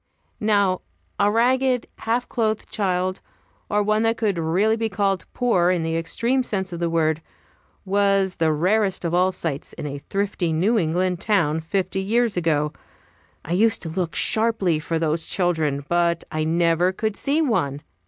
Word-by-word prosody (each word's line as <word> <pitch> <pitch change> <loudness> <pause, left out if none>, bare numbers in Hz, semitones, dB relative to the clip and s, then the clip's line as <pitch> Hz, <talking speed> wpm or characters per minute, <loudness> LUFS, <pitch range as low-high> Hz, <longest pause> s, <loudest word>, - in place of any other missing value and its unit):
Now 200 -3 +2 0.4
a 205 0 +4
ragged, 250 +2 +2
half 235 +2 -1
clothed 220 -2 -1
child, 185 -2 -1 0.5
or 210 0 +2
one 215 +1 +1
that 225 0 +1
could 205 -6 0
really 185 +7 +2
be 225 0 -2
called 195 -1 -1
poor, 185 -9 +2
in 180 -3 +1
the 165 0 -1
extreme 235 +10 0
sense 190 -6 -3
of 170 - -5
the 170 -1 0
word, 160 -1 +1 0.6
was 195 -1 +1
the 160 -1 +2
rarest 190 +4 +1
of 170 - -1
all 180 +2 +3
sights 155 -6 -3
in - - -7
a 140 -1 -5
thrifty 195 -4 -1
New 205 +8 +2
England 180 +1 0
town 165 -7 +1
fifty 190 +3 -2
years 230 +2 +1
ago. 150 -4 0 0.7
I 165 - -7
used 220 +4 +2
to 165 - -4
look 170 0 -3
sharply 215 -7 +1
for 165 +1 -2
those 160 0 0
children, 160 -6 0
but 170 -1 +1
I 155 0 -1
never 170 +2 +2
could 215 +2 -2
see 290 +3 0
one. 145 - 0
185 Hz, 165 wpm, -23 LUFS, 165-215 Hz, 0.7 s, a